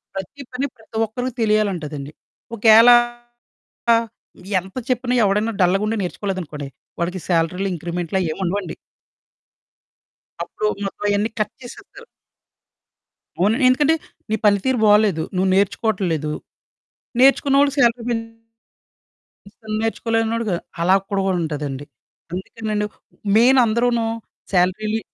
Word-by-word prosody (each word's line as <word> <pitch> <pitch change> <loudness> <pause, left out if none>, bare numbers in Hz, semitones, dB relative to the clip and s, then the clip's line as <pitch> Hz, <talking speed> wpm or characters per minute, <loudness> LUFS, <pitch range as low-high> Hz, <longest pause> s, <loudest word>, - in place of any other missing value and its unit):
ప్రతి 195 +9 -7
పని 265 +3 -1
ప్రతి 220 0 -10
ఒక్కరికి 245 +3 -4
తెలియాలంటదండి. 175 -10 -1 0.5
ఒకేళ 225 +2 +7 1.0
ఆహ్, 230 0 +2 0.5
ఎంత 190 +1 -13
చెప్పినా 250 0 0
ఎవడన్నా 210 +3 +1
డల్లగుండి 195 +5 +2
నేర్చుకోలేదనుకోండి, 175 -7 -4 0.3
వాడికి 180 +2 -2
శాలరీలో 180 +3 0
ఇంక్రిమెంట్లు 175 +2 -3
అయ్యేముండవండి. 180 +3 -2 1.7
అప్పుడూ 215 - -4 0.2
మొత్తం 195 - -7
అయన్నీ 205 +2 +1
కట్ 215 - -1
చేసేత్తరు. 405 - -12 1.3
అవును. 205 +6 +3
ఎందుకంటే, 290 +5 +3 0.4
నీ - - +1
పని 205 -1 +5
తీరు 260 -1 +1
బాలేదు, 205 -5 +4
నువ్వు 190 +1 +2
నేర్చుకోటల్లేదు. 185 -6 0 0.9
నేర్చుకున్నోళ్ళకి 275 +1 +4
శాలరీ 235 -1 +3
పెంచుతారు. 225 -1 -3 1.1
అసలు 215 +1 -8
నేర్చుకోలేనోడుగ 225 -1 -1 0.3
అలా 185 +3 +4
కూడాగ 195 -2 -1 0.2
ఉంటదండి. 145 -3 -4 0.5
అందుకేనండి, 210 +3 -3 0.5
మేయినందరును 235 -1 +4 0.5
శాలరీలి 205 +4 +1
210 Hz, 95 wpm, -21 LUFS, 180-230 Hz, 1.7 s, ఒకేళ